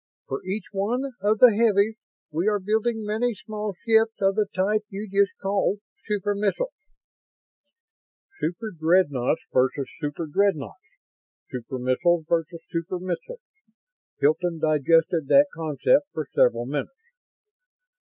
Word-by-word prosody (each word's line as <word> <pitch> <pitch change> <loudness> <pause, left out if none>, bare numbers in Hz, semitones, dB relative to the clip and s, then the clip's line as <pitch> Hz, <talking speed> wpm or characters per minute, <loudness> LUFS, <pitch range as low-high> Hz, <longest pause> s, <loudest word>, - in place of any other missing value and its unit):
For 135 - -4
each 195 +2 -3
one 235 +7 -1
of 210 +2 +2
the 245 0 +7
heavies, 215 -1 +3 0.4
we 165 +6 -1
are 210 -1 +2
building 220 +3 0
many 220 +3 0
small 210 -1 -5
ships 225 -1 +3
of 195 -1 +3
the 210 0 +1
type 205 +3 +1
you 205 +2 -6
just 200 0 +1
called 195 +1 0 0.3
'super 205 -1 0
missiles'." 205 - -1 1.7
"Superdreadnoughts 165 - +1
versus 130 +2 +1
superdreadnoughts, 155 +2 -2 0.5
super 125 +1 -5
missiles 155 +7 +1
versus 165 0 -1
super 170 +2 -3
missiles." 185 - -5 0.8
Hilton 165 +4 +1
digested 155 +1 +2
that 280 - +6
concept 165 - +1
for - - -3
several - - +3
minutes. 475 0 -6
195 Hz, 115 wpm, -25 LUFS, 165-215 Hz, 1.7 s, the